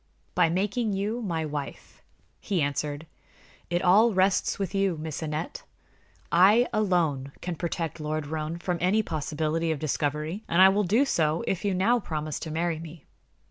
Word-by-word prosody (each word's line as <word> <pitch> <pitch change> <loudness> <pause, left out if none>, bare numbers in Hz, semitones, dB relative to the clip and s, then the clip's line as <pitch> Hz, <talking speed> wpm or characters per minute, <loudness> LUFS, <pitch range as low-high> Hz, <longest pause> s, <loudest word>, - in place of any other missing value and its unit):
"By 175 -2 +3
making 205 +5 0
you 210 +5 -2
my 165 -7 -2
wife," 145 -2 -7 0.4
he 195 -3 -1
answered. 145 +1 -2 0.6
"It 175 0 0
all 210 +5 +5
rests 190 0 +2
with 195 -3 -3
you, 195 -4 +1
Miss 155 0 -5
Aneth. 155 0 -4 0.7
I 205 +8 +6
alone 165 -10 0
can 180 - -3
protect 165 -2 -3
Lord 155 0 -2
Roane 155 +2 -4
from 175 0 -2
any 200 +5 +3
possibility 155 0 -1
of 160 - -1
discovery, 150 +5 -2
and 170 - +2
I 190 +1 +9
will 205 +1 +1
do 225 +10 +3
so 160 - +1
if 190 0 -2
you 200 -2 0
now 230 +7 +3
promise 155 -6 -4
to 160 - -6
marry 165 +1 -1
me. 160 -1 -11
170 Hz, 165 wpm, -27 LUFS, 155-195 Hz, 0.7 s, I